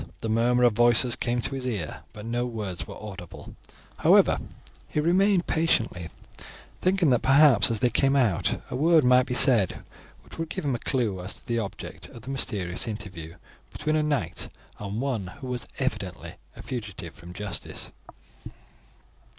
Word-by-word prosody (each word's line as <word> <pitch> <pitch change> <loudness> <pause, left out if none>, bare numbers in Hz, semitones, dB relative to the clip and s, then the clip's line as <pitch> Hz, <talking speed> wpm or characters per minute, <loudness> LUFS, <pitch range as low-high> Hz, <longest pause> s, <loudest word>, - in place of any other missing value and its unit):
The 110 - -3
murmur 120 +2 +2
of 120 -2 +5
voices 120 +1 +5
came 120 0 -1
to 135 - 0
his 130 -1 -3
ear, 100 -11 -3
but 105 0 -10
no 120 +1 -1
words 105 -10 -5
were - - -9
audible; 95 -5 -10 0.4
however, - - +5 0.5
he - - -2
remained 180 +3 +3
patiently, 115 - 0 0.7
thinking 185 -5 +3
that 125 - +3
perhaps 135 -5 +5
as 115 -3 -2
they 125 - +3
came 135 +4 +2
out 115 -10 +1
a - - -2
word 160 +1 +4
might 125 0 +5
be 125 - -2
said 120 -7 +4 0.4
which - - -14
would 165 -1 -3
give 165 - -4
him 140 - +1
a 120 - -2
clue 110 -10 -1
to 95 - -7
the 120 -2 -1
object 100 -4 -7
of 115 - -13
the 135 - -6
mysterious 95 -10 -2
interview 95 -7 -7 0.4
between 155 0 -1
a 155 - +2
knight 145 - -1 0.3
and 105 +2 -4
one 125 -9 -2
who 140 - -9
was 125 -2 -4
evidently - - -3 0.2
a - - -10
fugitive 105 -9 -6
from 85 +1 -12
justice. 105 +2 -5
120 Hz, 165 wpm, -26 LUFS, 105-135 Hz, 0.7 s, of